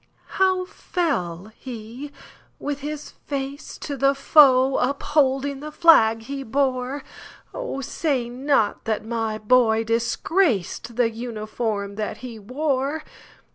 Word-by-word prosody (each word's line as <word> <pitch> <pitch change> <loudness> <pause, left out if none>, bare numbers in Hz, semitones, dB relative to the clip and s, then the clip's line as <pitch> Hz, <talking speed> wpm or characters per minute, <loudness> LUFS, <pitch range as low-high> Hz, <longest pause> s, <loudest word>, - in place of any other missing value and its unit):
"How 375 -1 +3
fell 215 - -2
he,—with 260 +4 -8
his 295 +1 -6
face 280 0 -6
to 285 - -5
the 275 +1 +3
foe, 270 -2 +5
Upholding 275 0 +1
the 305 +2 -7
flag 225 -10 +5
he 275 +3 -5
bore? 265 +1 -1 0.5
Oh, - - -4
say 270 -3 -1
not 250 -2 0
that 220 -1 -1
my 225 -1 -2
boy 225 0 +3
disgracedThe 235 - 0
uniform 215 -3 -4
that 215 -1 -3
he 230 -3 -8
wore!" 275 +6 -1
260 Hz, 105 wpm, -23 LUFS, 225-285 Hz, 0.5 s, foe